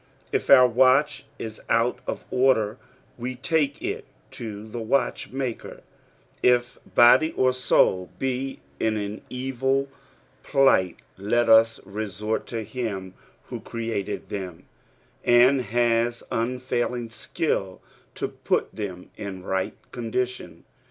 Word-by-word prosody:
If - - -1
our 130 -2 +9
watch 135 +3 +3
is 110 -1 -7
out 115 +2 +2
of - - -4
order, 125 -4 +2 0.4
we 125 +2 -4
take 145 +1 0
it - - -3 0.3
to 105 -2 -7
tlic 110 0 -6
watchmaker; 130 -1 -2 0.6
if 125 0 +2 0.2
body 120 +7 +6
or 130 0 +2
soul 95 -7 +2
be 135 - -3 0.2
in 110 -1 +1
an 105 0 -4
evil 135 +2 -1 0.5
plight, 115 -10 +3 0.2
let 120 +5 +2
ua 115 0 +7 0.2
resort 105 +2 -3
to 115 -2 -4
him 105 -5 -4 0.4
who - - -5
created 115 -3 -4
them, 95 -4 -6 0.6
and 125 +3 +5
has 120 +1 +1
unfailing 120 0 -2
skill 95 - -2 0.4
to - - -2
put - - -1
them 95 -4 -6
m 95 -3 -6
right 95 0 -2 0.2
condition. 125 +1 -4
120 Hz, 115 wpm, -25 LUFS, 105-130 Hz, 0.6 s, our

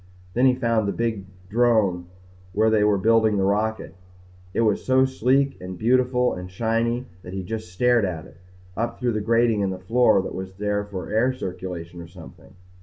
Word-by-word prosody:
Then 125 +2 +4
he 130 - +4
found 115 -4 0
the - - 0
big 115 -4 -2 0.2
drome 105 -5 +2 0.5
where 110 +2 +3
they 110 -1 +3
were 105 -1 +3
building 110 +1 +3
the 95 - +1
rocket. 105 +1 -1 0.6
It 115 - 0
was 110 -3 +1
so 130 0 +4
sleek 135 +2 +1
and 90 0 -7
beautiful 125 +3 +2
and 90 0 -7
shiny 115 +5 -1 0.2
that 90 0 -10
he 95 -1 -4
just 110 -2 -6
stared 120 +4 +2
at 85 -5 -3
it - - -17 0.4
up 115 +1 -3
through 120 -2 0
the 110 - -1
grating 115 0 +2
in 100 - 0
the 95 - -4
floor 115 +3 +3
that - - -6
was 95 0 -6 0.4
for 95 -2 -6
air 115 +4 +2
circulation 90 -5 -6
or 85 - -10
something. 90 +1 -15
110 Hz, 185 wpm, -23 LUFS, 95-120 Hz, 0.6 s, Then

